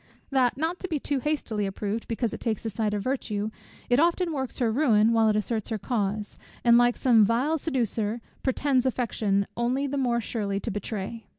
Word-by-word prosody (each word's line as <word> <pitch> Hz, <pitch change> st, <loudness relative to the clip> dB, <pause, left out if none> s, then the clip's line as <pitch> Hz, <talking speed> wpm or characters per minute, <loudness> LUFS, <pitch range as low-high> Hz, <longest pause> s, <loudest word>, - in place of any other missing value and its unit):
That, 255 Hz, -2 st, +2 dB
not 325 Hz, +4 st, -1 dB
to 375 Hz, -, -4 dB
be 315 Hz, -5 st, -1 dB
too 280 Hz, 0 st, -1 dB
hastily 245 Hz, -8 st, -1 dB
approved, 205 Hz, +3 st, -3 dB
because 230 Hz, -1 st, -1 dB
it -, -, -5 dB
takes 220 Hz, -3 st, -2 dB
the 225 Hz, -, -3 dB
side 210 Hz, 0 st, -1 dB
of 205 Hz, -, -2 dB
virtue, 220 Hz, -5 st, -2 dB, 0.4 s
it 245 Hz, +2 st, +3 dB
often 340 Hz, +1 st, +2 dB
works 265 Hz, -3 st, -3 dB
her 235 Hz, -3 st, +1 dB
ruin 225 Hz, -4 st, +4 dB
while 225 Hz, -1 st, +4 dB
it 210 Hz, -, +2 dB
asserts 215 Hz, 0 st, -1 dB
her 220 Hz, -, -1 dB
cause, 210 Hz, -2 st, -2 dB, 0.2 s
and 235 Hz, -1 st, +6 dB
like 240 Hz, 0 st, +4 dB
some 235 Hz, -4 st, +5 dB
vile 255 Hz, +9 st, +1 dB
seducer, 235 Hz, -6 st, -1 dB, 0.2 s
pretends 265 Hz, -1 st, +1 dB
affection 215 Hz, -5 st, 0 dB
only 250 Hz, +4 st, 0 dB
the 280 Hz, 0 st, -2 dB
more 240 Hz, -3 st, +1 dB
surely 205 Hz, -3 st, -2 dB
to 230 Hz, -, -3 dB
betray. 205 Hz, +2 st, -5 dB
235 Hz, 195 wpm, -26 LUFS, 215-265 Hz, 0.4 s, and